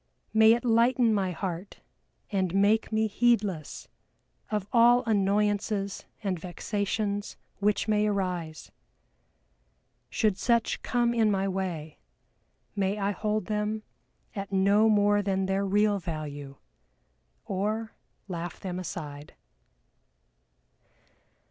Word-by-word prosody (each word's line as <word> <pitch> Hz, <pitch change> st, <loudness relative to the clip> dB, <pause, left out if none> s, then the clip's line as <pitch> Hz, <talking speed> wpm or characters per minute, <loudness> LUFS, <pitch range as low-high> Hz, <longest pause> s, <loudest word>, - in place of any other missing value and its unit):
May 220 Hz, 0 st, +7 dB
it 240 Hz, +1 st, -2 dB
lighten 235 Hz, 0 st, +3 dB
my 195 Hz, -3 st, +1 dB
heart 180 Hz, +1 st, -5 dB, 0.5 s
and 190 Hz, -3 st, 0 dB
make 205 Hz, +3 st, +3 dB
me 220 Hz, 0 st, +2 dB
heedless 210 Hz, -7 st, 0 dB, 0.6 s
of 210 Hz, -2 st, -2 dB
all 240 Hz, +1 st, +6 dB
annoyances 205 Hz, -1 st, 0 dB, 0.2 s
and 190 Hz, -4 st, -1 dB
vexations 200 Hz, +3 st, -3 dB, 0.2 s
which 205 Hz, +2 st, +1 dB
may 210 Hz, 0 st, +2 dB
arise! 180 Hz, -6 st, -3 dB, 1.4 s
Should 210 Hz, -4 st, 0 dB
such 235 Hz, -1 st, +1 dB
come 240 Hz, -1 st, +1 dB
in 225 Hz, -2 st, +3 dB
my 195 Hz, -1 st, +1 dB
way, 180 Hz, -5 st, -4 dB, 0.8 s
may 200 Hz, 0 st, 0 dB
I 200 Hz, 0 st, 0 dB
hold 210 Hz, +1 st, -2 dB
them 210 Hz, +1 st, -2 dB, 0.5 s
at 195 Hz, -1 st, -5 dB
no 200 Hz, +3 st, +4 dB
more 205 Hz, -1 st, +4 dB
than 195 Hz, -1 st, 0 dB
their 195 Hz, +1 st, 0 dB
real 205 Hz, +1 st, +2 dB
value, 150 Hz, -5 st, -6 dB, 0.9 s
or 215 Hz, +3 st, -2 dB, 0.3 s
laugh 175 Hz, -2 st, -5 dB
them 180 Hz, -1 st, -4 dB
aside!" 150 Hz, -5 st, -7 dB
200 Hz, 105 wpm, -28 LUFS, 190-215 Hz, 1.4 s, May